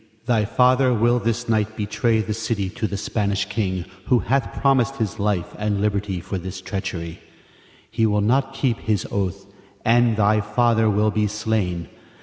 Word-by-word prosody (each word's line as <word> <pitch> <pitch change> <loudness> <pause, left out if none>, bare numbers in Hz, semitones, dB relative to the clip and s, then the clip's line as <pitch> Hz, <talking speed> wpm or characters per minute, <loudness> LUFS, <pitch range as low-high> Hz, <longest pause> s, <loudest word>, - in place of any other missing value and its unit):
Lady, 110 - -33 0.2
Thy 115 -4 +2
father 125 +3 +3
will 120 +2 +3
this 115 +1 -2
night 110 -1 0
betray 110 +2 +1
the 105 0 -3
city 110 -3 -2
to 115 0 -2
the 100 - -4
Spanish 100 0 -1
king, 100 -4 -2 0.2
who 125 - +4
hath 130 +1 -1
promised 135 -1 +2
his 110 -8 -3
life 100 -4 -1
and 105 -1 0
liberty 100 -2 -1
for 95 +2 -4
this 95 +1 -6
treachery. 95 -4 -5 0.7
He 115 0 +2
will 105 -1 +1
not 130 +6 +2
keep 130 -4 0
his 105 -4 -1
oath, 100 0 -2 0.4
and 115 -1 +4
thy 105 0 +3
father 110 +1 +2
will 105 +1 +2
be 105 0 +1
slain. 105 -6 -2
105 Hz, 170 wpm, -22 LUFS, 100-115 Hz, 0.7 s, who